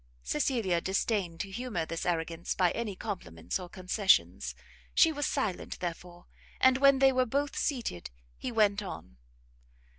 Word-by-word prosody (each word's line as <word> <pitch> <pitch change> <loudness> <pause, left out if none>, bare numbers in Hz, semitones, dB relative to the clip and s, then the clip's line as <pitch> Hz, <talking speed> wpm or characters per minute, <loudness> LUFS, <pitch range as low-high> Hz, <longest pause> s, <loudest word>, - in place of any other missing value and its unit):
Cecilia 180 - 0
disdained 190 -3 -1
to 195 - -6
humour 215 -6 -3
this 165 +2 -4
arrogance 165 0 -1
by 180 -2 +3
any 220 -4 -3
compliments 90 - -4
or 180 -1 -8
concessions: 190 +2 +1 0.4
she 325 - +6
was 290 -1 -1
silent, 220 -10 -2
therefore; 175 0 -6 0.3
and 260 0 +5
when 275 -1 +6
they 270 0 +6
were 255 -1 +2
both 280 +4 -1
seated, 235 - -2 0.3
he 255 - -5
went 210 -2 +3
on. 65 - -8
195 Hz, 145 wpm, -30 LUFS, 175-255 Hz, 0.4 s, she